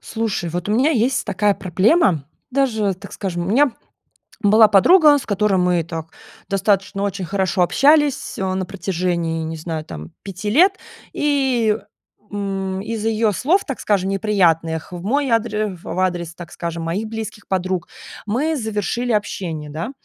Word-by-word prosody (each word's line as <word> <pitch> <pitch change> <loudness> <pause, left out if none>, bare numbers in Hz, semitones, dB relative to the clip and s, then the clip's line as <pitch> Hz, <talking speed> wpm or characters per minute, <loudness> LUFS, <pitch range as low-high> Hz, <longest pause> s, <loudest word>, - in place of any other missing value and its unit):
Слушай, 220 -7 -3
вот 175 +2 -4
у 210 - +1
меня 260 +7 +3
есть 255 -2 +1
такая 205 -1 +1
проблема, 185 - +2 0.3
даже, 225 -7 +1
так 200 +2 -12
скажем, 175 -3 -3
у - - -2
меня 270 +4 +4 0.7
была 215 +1 +6
подруга, 295 - +6
с 275 - -6
которой 205 -1 +1
мы 180 -2 +2
так 165 0 -6 0.4
достаточно 195 0 0
очень 195 -2 -2
хорошо 190 0 0
общались, 290 - +2
а, 190 -1 -1
на 190 0 -2
протяжении, 175 -4 -2
не 160 0 -5
знаю, 160 -1 -4
там 75 0 -9
5 195 +1 -5
лет. 370 - +4 0.4
И, 260 -7 +1 0.6
м, 195 -2 -3
из 220 +1 -4
ее 220 -1 +1
слов, 335 - +1
так 275 - -5
скажем, 195 -2 +1
неприятных 175 -5 +1
в 175 - -7
мой 275 +7 0
адре 215 -3 0
ф 175 - -14
в 175 - -4
адрес, 175 -3 -1
так 175 -1 -10
скажем, 170 -1 -4
моих 185 +7 -2
близких 215 -2 -6
подруг, 185 -2 -1 0.4
мы 275 +10 0
завершили 220 0 -2
общение, 175 -8 -2
да. 160 - -4
200 Hz, 160 wpm, -20 LUFS, 175-225 Hz, 0.7 s, была